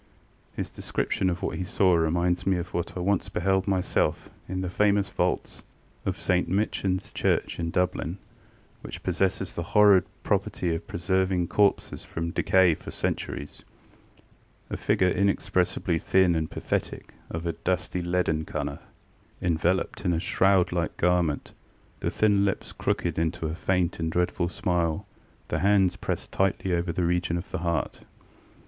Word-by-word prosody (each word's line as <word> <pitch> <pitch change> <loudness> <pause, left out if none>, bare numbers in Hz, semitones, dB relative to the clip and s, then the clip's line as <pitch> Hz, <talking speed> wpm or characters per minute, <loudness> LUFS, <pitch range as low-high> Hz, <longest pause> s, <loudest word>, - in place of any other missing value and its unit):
His - - -4
description 95 - -1
of 85 0 -3
what - - -2
he - - -1
saw 90 0 +3
reminds 85 +2 +1
me 95 -2 +3
of 85 0 -5
what 85 +1 -3
I - - -2
once 100 +1 +1
beheld 95 0 +1
myself 95 -2 0 0.2
in 95 0 -2
the 90 - -2
famous 100 0 +2
vaults - - -1 0.5
of - - -1
St 90 -1 +1
MichanŌĆÖs 95 -1 -1
Church - - 0
in 85 -1 -1
Dublin, 90 0 -1 0.6
which - - -8
possess 95 0 +1 0.2
the - - -3 0.2
horrid 100 -3 +7 0.2
property 85 -2 0
of 80 - -5
preserving 95 0 0
corpses 100 -1 +1
from 85 0 -4
decay 95 0 +4
for - - -9
centuries. 70 - -4 1.1
A - - -1
figure 90 - +2
inexpressibly 90 -2 +1
thin 95 0 +3
and 80 -1 -1
pathetic, - - -3 0.2
of 80 +1 -5
a 85 - 0
dusty 90 0 -2
leaden 85 -3 0
colour, 70 -2 -4 0.6
enveloped 85 +1 0
in 90 -3 +2
a 80 - +1
shroud 95 +1 +3
like 85 -2 -2
garment, 90 -4 +1 0.5
the - - -1
thin 105 -2 +3
lips 100 -1 -1
crooked - - -1
into 80 0 -1
a 80 - -2
faint 90 0 0
and 80 0 -1
dreadful 90 0 0
smile, 85 -2 -1 0.4
the - - 0
hands 95 -2 +3
pressed - - -4
tightly 95 -1 0
over 85 0 0
the 85 +1 0
region 85 0 +1
of 85 - -7
the - - -2
heart. 85 -1 -1
90 Hz, 155 wpm, -27 LUFS, 85-95 Hz, 1.1 s, horrid